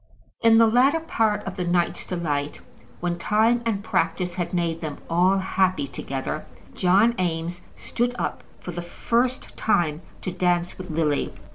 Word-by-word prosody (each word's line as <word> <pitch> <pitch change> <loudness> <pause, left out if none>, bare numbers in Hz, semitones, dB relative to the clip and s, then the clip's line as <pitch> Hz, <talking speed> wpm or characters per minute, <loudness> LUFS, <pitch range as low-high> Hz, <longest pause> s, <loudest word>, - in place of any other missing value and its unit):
In 225 -1 +6
the 230 - +7
latter 255 +8 +4
part 220 -10 0
of 195 0 -6
the 180 - -1
night's 175 0 0
delight, 150 -5 -2 0.4
when 175 0 -1
time 220 +6 +3
and 205 -3 -1
practice 175 -1 0
had 175 -1 -3
made 170 -2 -1
them 155 -3 -4
all 180 +3 +4
happy 190 -4 +1
together, 135 +3 -4 0.3
John 195 +6 +4
Eames 170 0 -2
stood 245 +1 -2
up - - -3 0.2
for 180 - -6
the 175 0 -5
first 240 +8 -1
time 165 -7 +1 0.2
to 185 - -2
dance 175 -1 0
with 185 0 -7
Lily. 155 -2 0
180 Hz, 155 wpm, -24 LUFS, 170-215 Hz, 0.4 s, the